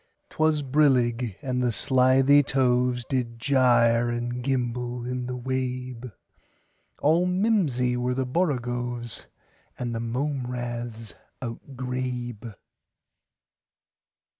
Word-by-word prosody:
'T - - -18
was 155 -1 +3
brillig, 125 -6 +2
and 125 -1 -1
the 125 -1 +2
slithy 130 +4 +4
tovesDid 125 -2 0
gyre 120 -2 +3
and 120 +1 -3
gimble 125 -2 -2
in 125 0 -3
the 125 0 -4
wabe; 125 -1 -3 0.9
All 165 +4 +3
mimsy 180 - +1
were 125 +1 -1
the 130 0 0
borogoves, 120 -5 -2 0.5
And 120 -1 -3
the 115 - -2
mome 125 +3 -2
raths 120 -2 -5 0.3
outgrabe. 125 -2 -5
125 Hz, 95 wpm, -26 LUFS, 120-130 Hz, 0.9 s, slithy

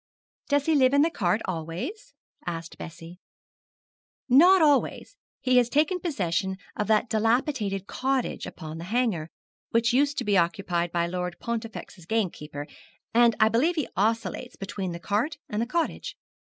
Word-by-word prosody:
'Does 285 -1 +2
he 320 - +3
live 270 -2 +4
in 285 - +6
that 330 - +1
cart 195 +2 +1
always?' 175 - -5 0.3
asked 165 -1 -5
Bessie. 170 +1 -9 1.1
'Not 345 +9 +7
always; 300 - +2 0.3
he 255 -1 +3
has 240 -1 +4
taken 310 +7 +2
possession 190 - -1 0.2
of 210 - -2
that 215 +2 +3
dilapidated 220 -3 0
cottage 265 +2 -1
upon 160 0 -8
the 170 - -6
Hanger, 210 -7 0 0.4
which 230 +1 +2
used 285 +2 +2
to - - 0
be 205 -1 +2
occupied 175 -1 0
by 170 0 +1
Lord 180 0 -3
Pontifex's 225 -6 -6
gamekeeper, 155 -9 -2 0.5
and 235 0 +5
I 220 - +6
believe 255 +11 +2
he 305 -5 -1
oscillates 220 -1 -1
between 195 -2 -4
the 170 - -6
cart 215 - -1
and 210 +1 -2
the 235 - -1
cottage. 335 +5 -2
220 Hz, 155 wpm, -26 LUFS, 175-265 Hz, 1.1 s, Not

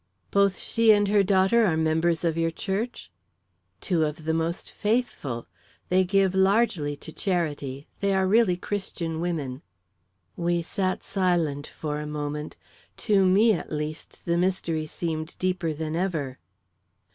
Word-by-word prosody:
"Both 200 -1 +3
she 230 -1 +3
and 205 -1 +4
her 205 0 +5
daughter 195 +4 +4
are 170 -7 +2
members 160 +1 +1
of 165 -2 +1
your 165 0 +1
church?" 195 - -4 0.7
"Two 170 -4 +1
of 155 +1 -3
the 160 - +1
most 165 +2 -2
faithful. 205 - -1 0.4
They 185 +1 +4
give 195 0 +2
largely 190 -6 +2
to 150 +3 -10
charity; 150 -6 -2
they 200 -1 +1
are 190 0 +2
really 200 -3 +4
Christian 180 -4 -3
women." 150 -7 -3 0.7
We 170 0 0
sat 185 +2 -2
silent 170 -7 0
for 150 -1 -4
a 150 - -5
moment. 150 0 -4 0.5
To 200 -4 +4
me, 210 +5 +5
at 175 - -4
least, 150 +1 -5
the 170 0 +1
mystery 175 -4 0
seemed 155 0 -4
deeper 185 -3 0
than 155 +1 -3
ever. 160 -8 -2
170 Hz, 145 wpm, -26 LUFS, 155-195 Hz, 0.7 s, her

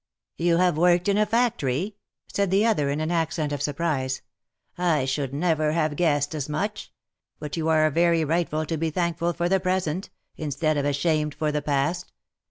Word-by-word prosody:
" - - -66
You 170 0 +2
have 180 -3 +2
worked 175 +1 +3
in 200 +1 +3
a 215 - +3
factory 215 - +1
V 210 - -27 0.4
said 200 -1 +1
the 195 +4 +3
other 175 -12 +2
in 145 +2 -1
an 155 +2 -1
accent 160 -3 -1
of 145 - -3
surprise; 140 -4 -1 0.5
"I 165 -6 +1
should 135 0 -2
never 155 0 +1
have 155 -2 0
guessed 145 -3 +1
as 150 -2 -4
much 205 +8 -3 0.2
— - - -57
but 150 -1 -5
you 160 -1 -2
are 155 -1 +4
very 170 +1 +3
right 170 +3 0
to 155 +1 -2
be 165 +1 0
thankful 170 +1 -1
for 175 0 -1
the 190 +1 +2
present, 185 -1 -1 0.3
instead 155 +1 -1
of 145 -1 0
ashamed 150 +1 0
for 150 0 -1
the 150 0 -1
past. 145 +5 -1
160 Hz, 195 wpm, -25 LUFS, 150-175 Hz, 0.5 s, are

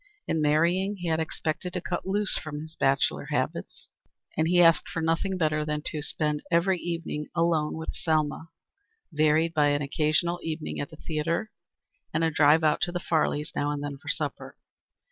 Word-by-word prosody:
In 160 - 0
marrying 170 +7 +2
he 175 -3 -4
had 160 0 +1
expected 160 +2 -3
to 180 - -1
cut 175 +1 -4
loose 205 +1 +1
from 150 -1 -5
his 160 +1 -10
bachelor 135 +1 +1
habits, - - -3 0.5
and 160 +1 +1
he 175 +1 +3
asked 165 -1 +5
for - - -3
nothing 165 +4 0
better 155 -3 +1
than 150 0 -3
to 150 - -3
spend 150 0 -1
every 180 +2 +2
evening 165 -3 -4
alone 160 -2 +1
with 160 - -5
Selma, 155 0 -1 0.6
varied 155 +2 +3
by 150 -2 +4
an 145 0 +1
occasional 155 +4 +1
evening 160 -1 -4
at 145 - -3
the - - -12
theatre, 165 +7 -2 0.6
and - - +2
a 165 - +2
drive 150 +2 +5
out 150 -1 +3
to 175 - +1
the 175 - -2
Farleys' 155 -2 0
now 145 - 0
and 145 -1 -3
then 140 -1 -5
for - - -9
supper. - - -3
160 Hz, 185 wpm, -27 LUFS, 150-170 Hz, 0.6 s, asked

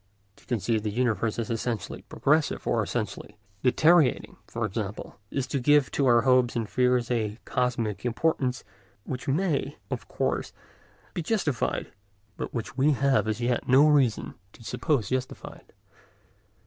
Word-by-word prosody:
To - - -22
conceive 115 -2 0
the 105 - -2
universe 115 -1 0
as 115 -1 -3
essentially 115 -3 -3
progressive 150 +2 0
or 115 - +1
essentially 105 -1 -4 0.2
deteriorating, 155 +3 +3
for 115 -1 -3
example, 105 -1 -5
is 135 -2 -2
to 140 - -1
give 145 +2 +4
to 140 - +1
our 120 -1 +5
hopes 125 0 +3
and 115 -2 -1
fears 125 0 +1
a 110 -3 -1
cosmic 115 -6 -1
importance 125 0 0 0.4
which 125 +3 -6
may, 155 +2 0
of - - -4
course, - - -2 0.6
be 175 - -2
justified, 155 - -1 0.4
but - - -5
which 115 -1 -5
we 140 +3 +3
have 135 -3 +2
as 110 +2 -2
yet 120 0 0
no 135 +4 +6
reason 140 -7 +2 0.2
to - - -15
suppose 125 - -1
justified. 130 0 -5
125 Hz, 145 wpm, -27 LUFS, 115-140 Hz, 0.6 s, no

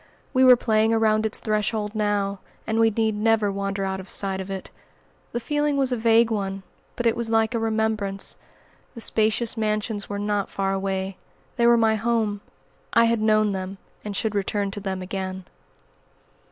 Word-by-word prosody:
We 260 -1 +4
were 255 -1 +9
playing 220 -1 +2
around 220 -1 +2
its 215 - -5
threshold 215 0 -1
now, 205 -2 -1 0.3
and 220 0 -1
we 225 0 +5
need 220 0 0
never 215 -1 +2
wander 195 0 -2
out 190 0 -3
of 190 - -10
sight 190 -1 +1
of 190 - -8
it. 195 -1 -6 0.6
The 240 - -2
feeling 295 +3 0
was 265 -2 +2
a - - +2
vague 230 0 +3
one, 195 -2 -2 0.3
but 240 - -3
it 230 - +3
was 235 -1 -1
like 225 +1 +2
a 230 - 0
remembrance. 220 -3 0 0.6
The 230 - -7
spacious 220 +1 +1
mansions 215 -1 -2
were 205 - -3
not 205 -1 -1
far 195 0 -1
away. 190 -1 -2 0.4
They 235 -2 +3
were 235 0 +6
my 220 -1 +3
home. 220 -2 0 0.5
I 230 -1 +5
had 230 -1 +1
known 215 -1 +3
them, 190 0 -5 0.3
and 205 -2 -4
should 220 -2 0
return 200 0 -1
to 205 - -6
them 190 -2 -4
again. 190 0 -5
215 Hz, 180 wpm, -24 LUFS, 195-225 Hz, 0.6 s, were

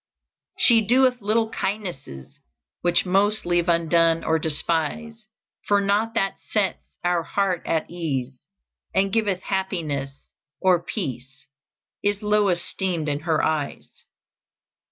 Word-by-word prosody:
"She 230 -3 +5
doeth 250 +2 +3
little 220 +2 +1
kindnesses 175 - -5 0.4
Which 175 +1 +2
most 200 +4 +2
leave 175 0 +1
undone 165 0 +3
or 160 0 +1
despise; 170 +9 -2 0.4
For 205 0 +4
naught 205 +3 +1
that 195 - 0
sets 205 -4 0 0.2
our 175 -1 +2
heart 185 +1 -1
at 160 -1 0
ease, 140 -7 -3 0.6
And 195 0 +2
giveth 205 -5 +1
happiness 170 -8 -2 0.5
or 185 -2 +3
peace, 135 - -6 0.6
Is 205 +1 0
low 210 -1 +3
esteemed 175 -2 -2
in 145 0 -1
her 155 - +2
eyes. 155 -2 -2
180 Hz, 115 wpm, -24 LUFS, 160-205 Hz, 0.6 s, She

